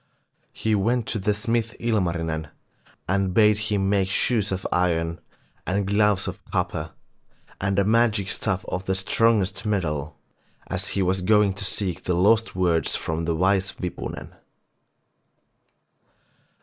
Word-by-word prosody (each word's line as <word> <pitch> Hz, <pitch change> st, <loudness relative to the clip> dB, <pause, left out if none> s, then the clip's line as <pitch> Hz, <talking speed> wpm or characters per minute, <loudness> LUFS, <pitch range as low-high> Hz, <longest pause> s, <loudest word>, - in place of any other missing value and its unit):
He 110 Hz, -, -1 dB
went 115 Hz, +4 st, +1 dB
to 110 Hz, -, -2 dB
the 100 Hz, +2 st, +1 dB
smith 115 Hz, +2 st, -1 dB
Ilmarinen 85 Hz, -8 st, -1 dB, 0.6 s
and 95 Hz, 0 st, 0 dB
bade 105 Hz, -2 st, +5 dB
him 105 Hz, -2 st, 0 dB
make 95 Hz, -1 st, +1 dB
shoes 110 Hz, 0 st, +1 dB
of 95 Hz, 0 st, -3 dB
iron, 85 Hz, -2 st, 0 dB, 0.5 s
and 100 Hz, +3 st, 0 dB
gloves 100 Hz, -1 st, +2 dB
of -, -, -6 dB
copper, -, -, -3 dB, 0.7 s
and 95 Hz, 0 st, -1 dB
a 100 Hz, -, +4 dB
magic 105 Hz, -2 st, +2 dB
staff 95 Hz, -4 st, -1 dB
of 90 Hz, +1 st, -4 dB
the 95 Hz, -, 0 dB
strongest 100 Hz, +1 st, +1 dB
metal, 85 Hz, -8 st, -2 dB, 0.5 s
as 95 Hz, +1 st, -3 dB
he 95 Hz, -, +2 dB
was 95 Hz, +1 st, +1 dB
going 105 Hz, +1 st, +3 dB
to 95 Hz, -, -4 dB
seek 95 Hz, -3 st, -2 dB
the 90 Hz, -, +1 dB
lost 110 Hz, +5 st, +3 dB
words 85 Hz, -4 st, +1 dB
from 80 Hz, +1 st, -3 dB
the 85 Hz, 0 st, 0 dB
wise 95 Hz, +3 st, +1 dB
Wipunen. 90 Hz, -2 st, -6 dB
95 Hz, 135 wpm, -24 LUFS, 90-105 Hz, 0.7 s, bade